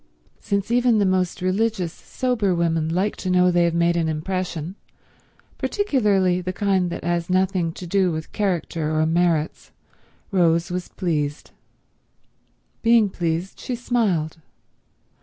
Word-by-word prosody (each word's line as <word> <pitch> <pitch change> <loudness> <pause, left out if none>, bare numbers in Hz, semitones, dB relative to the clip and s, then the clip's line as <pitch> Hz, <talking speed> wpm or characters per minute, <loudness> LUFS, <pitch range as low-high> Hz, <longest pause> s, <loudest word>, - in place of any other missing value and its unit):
Since 200 +2 -2
even 245 -1 +3
the 205 - +3
most 185 -1 0
religious, 190 -2 0
sober 225 -8 -1
women 165 -2 0
like 185 +5 0
to 185 - -4
know 180 0 +4
they 175 -1 +3
have 170 -1 0
made 170 0 +2
an 165 -2 +1
impression, 170 +1 -3 0.9
particularly 205 - +1
the 180 +1 -3
kind 190 -2 +1
that - - -6
has 170 0 -1
nothing 185 -2 +1
to 180 - -8
do 185 0 +2
with 160 -1 -5
character 165 -5 -1
or 155 - +3
merits, 165 -1 0 0.6
Rose 170 -2 +2
was 180 0 -3
pleased. 150 -5 -3 1.3
Being 230 -3 +4
pleased, 170 +2 -2
she 250 - -3
smiled. 210 -11 0
180 Hz, 135 wpm, -23 LUFS, 170-200 Hz, 1.3 s, know